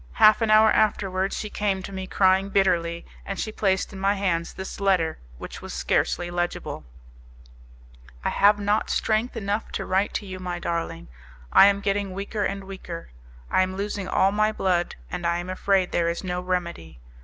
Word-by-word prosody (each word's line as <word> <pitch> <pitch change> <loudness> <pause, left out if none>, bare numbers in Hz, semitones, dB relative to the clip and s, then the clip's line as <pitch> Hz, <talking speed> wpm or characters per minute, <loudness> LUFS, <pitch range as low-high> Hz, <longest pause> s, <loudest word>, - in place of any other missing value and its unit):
Half 215 - +6
an 225 - +1
hour 215 0 +6
afterwards 195 -2 +1
she 210 - -5
came 195 -2 -1
to 200 - -7
me, 190 -1 -5
crying 190 0 +3
bitterly, 170 -4 +1 0.2
and 195 - -5
she 215 - -2
placed 195 -2 0
in 190 - -8
my 195 +1 +2
hands 175 -4 -1
this 190 +2 -7
letter, 185 -5 +1 0.2
which - - -8
was - - -7
scarcely 175 0 0
legible: 175 0 -3 1.4
"I - - +3
have 205 +1 +4
not 205 +1 0
strength 220 +3 0
enough 205 +1 -2
to - - -3
write 190 +2 0
to - - -2
you, 185 -1 -7
my 180 -1 -4
darling; 170 - -3 0.5
I - - +9
am 200 0 +2
getting 200 -1 -1
weaker 200 +2 -3
and 195 0 -2
weaker; 185 - -8 0.4
I - - +4
am 185 0 -1
losing 200 -1 -3
all 190 +1 +3
my 215 +1 +2
blood, 180 -4 0 0.2
and 180 -1 -4
I 170 0 +1
am 175 +1 -4
afraid 190 0 +1
there 170 -1 +1
is 170 - -3
no 180 -1 -2
remedy. 170 - -4
190 Hz, 185 wpm, -25 LUFS, 180-200 Hz, 1.4 s, I